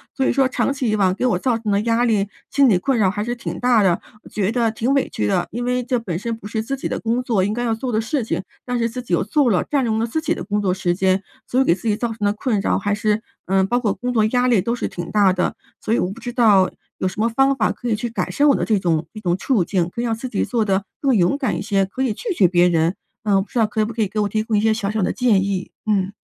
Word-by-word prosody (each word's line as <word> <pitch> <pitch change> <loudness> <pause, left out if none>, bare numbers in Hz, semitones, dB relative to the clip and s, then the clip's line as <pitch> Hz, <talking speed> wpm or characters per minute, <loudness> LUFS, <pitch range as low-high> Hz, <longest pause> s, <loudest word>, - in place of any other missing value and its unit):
所 270 - 0
以 - - +3
说 270 -1 +3
长 265 +1 0
期 265 -4 -1
以 - - +2
往， 190 -3 +2
给 250 - -1
我 220 -8 +2
造 240 +2 +1
成 220 -2 -3
的 200 +1 +2
压 230 +2 +1
力、 210 -4 +1 0.2
心 275 -2 +4
理 195 - +4
困 260 +8 0
扰 195 -3 +4
还 205 +1 -2
是 240 +2 -3
挺 235 - -6
大 245 -3 +4
的， 180 -2 +2 0.2
我 - - -14
觉 205 -1 -1
得 235 -1 +1
挺 235 +5 0
委 275 - +1
屈 105 - -2
的， - - 0
因 240 +3 -3
为 250 0 0
这 250 0 0
本 185 -8 -4
身 230 +3 -3
不 220 - -15
是 220 +1 -2
自 270 +5 -3
己 - - -3
的 - - -3
工 235 +2 -1
作 220 -7 +1
应 205 - 0
该 240 - -2
要 230 -2 +1
做 245 +3 -3
的 220 - +1
事 255 +4 -1
情， 215 - -2 0.2
但 245 -1 -1
是 230 -1 +1
自 250 +2 -5
己 235 -7 -5
又 - - 0
做 255 +5 +2
了， 190 -5 +2
占 280 -3 +1
用 220 -1 0
了 225 - +1
自 275 +7 -2
己 320 +1 0
的 - - -6
工 210 0 -1
作 190 -3 +1
时 180 -2 0
间， 190 +1 +1 0.2
所 255 - 0
以 - - +5
给 220 - +3
自 210 +5 -7
己 210 - +2
造 240 0 -1
成 225 - -7
的 205 - +3
困 215 -1 -1
扰 - - +1
还 205 0 -1
是 210 +1 0 0.2
嗯， 190 0 +3
包 245 +4 +1
括 215 -5 0
工 245 +6 -3
作 220 -3 +3
压 245 +3 +2
力 235 -6 +4
都 235 +5 -1
是 - - -3
挺 175 -1 -6
大 200 -3 +4
的。 180 0 -1 0.3
所 - - -2
以 - - +3
我 180 - -1
不 215 - -9
知 245 - -4
道， 210 -7 +4 0.3
有 185 - 0
什 185 - -6
么 220 - +3
方 270 +4 +2
法 230 - +1
可 245 - -7
以 220 - +2
去 215 +3 -3
改 200 -6 -3
善 290 - +2
我 280 - +5
的 - - -1
这 215 - +2
种 170 -3 0
一 215 - -8
种 175 -4 0
处 225 -3 +1
境， 180 -3 0
可 235 - -3
以 - - -1
让 230 - 0
自 255 +3 -6
己 - - -1
做 235 -3 0
得 195 0 +1 0.2
更 270 -4 +2
勇 180 +5 +3
敢 270 - -1
一 - - -4
些， 195 -2 +1
可 225 +8 -4
以 250 -5 0
拒 420 - -5
绝 190 - +5
别 175 0 +4
人。 165 +1 +2 0.3
嗯， 200 -2 +3
不 - - -19
知 - - -5
道 220 - +5
可 215 +1 0
不 225 - -5
可 230 - -2
以 210 - +2
给 215 +3 -4
我 205 - 0
提 215 +2 -1
供 220 -1 -1
一 - - +2
些 220 0 +3
小 215 -2 -2
小 220 0 -1
的 180 - +1
建 220 -7 +2
议？ 195 -2 -3 0.2
嗯。 195 -2 +1
220 Hz, 345 characters per minute, -21 LUFS, 195-245 Hz, 0.3 s, 以